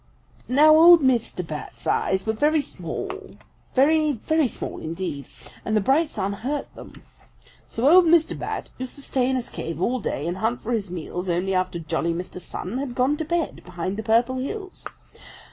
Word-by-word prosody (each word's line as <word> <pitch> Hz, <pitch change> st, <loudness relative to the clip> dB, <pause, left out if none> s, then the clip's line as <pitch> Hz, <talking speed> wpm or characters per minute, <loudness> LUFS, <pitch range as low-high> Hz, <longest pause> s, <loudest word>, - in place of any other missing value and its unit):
"Now 300 Hz, +4 st, +6 dB
old 335 Hz, +1 st, +8 dB
Mr. 235 Hz, -8 st, +1 dB
Bat's 155 Hz, -2 st, -8 dB
eyes 190 Hz, 0 st, 0 dB
were 220 Hz, -, 0 dB
very 300 Hz, +7 st, +2 dB
small, 230 Hz, -, -5 dB, 0.6 s
very, 305 Hz, +3 st, +4 dB
very 310 Hz, +5 st, +1 dB
small -, -, -6 dB
indeed, 160 Hz, -3 st, -5 dB, 0.4 s
and 215 Hz, -1 st, 0 dB
the -, -, +4 dB
bright 280 Hz, +9 st, +2 dB
sun 200 Hz, -8 st, -2 dB
hurt 275 Hz, +8 st, -4 dB
them. -, -, -13 dB, 0.6 s
So 235 Hz, +4 st, -1 dB
old 355 Hz, +4 st, +7 dB
Mr. 325 Hz, -1 st, +4 dB
Bat -, -, -5 dB
used 255 Hz, -1 st, -6 dB
to 280 Hz, -, -10 dB
stay 255 Hz, -2 st, 0 dB
in 265 Hz, -, +1 dB
his 250 Hz, -2 st, -4 dB
cave 165 Hz, -1 st, -5 dB
all 250 Hz, +7 st, 0 dB
day 150 Hz, -, -3 dB
and 175 Hz, +2 st, -2 dB
hunt 225 Hz, +4 st, -1 dB
for 235 Hz, -, -5 dB
his 210 Hz, -5 st, -1 dB
meals 180 Hz, +1 st, -5 dB
only 180 Hz, +3 st, 0 dB
after 185 Hz, -1 st, 0 dB
jolly 165 Hz, +1 st, -2 dB
Mr. 180 Hz, +1 st, -6 dB
Sun 190 Hz, +7 st, -5 dB
had 265 Hz, -3 st, -4 dB
gone 260 Hz, +3 st, +2 dB
to 315 Hz, -, -3 dB
bed 340 Hz, 0 st, -2 dB
behind 180 Hz, +2 st, -4 dB
the 220 Hz, -, -4 dB
Purple 235 Hz, +4 st, +2 dB
Hills. 380 Hz, +9 st, -6 dB
240 Hz, 185 wpm, -24 LUFS, 185-295 Hz, 0.6 s, old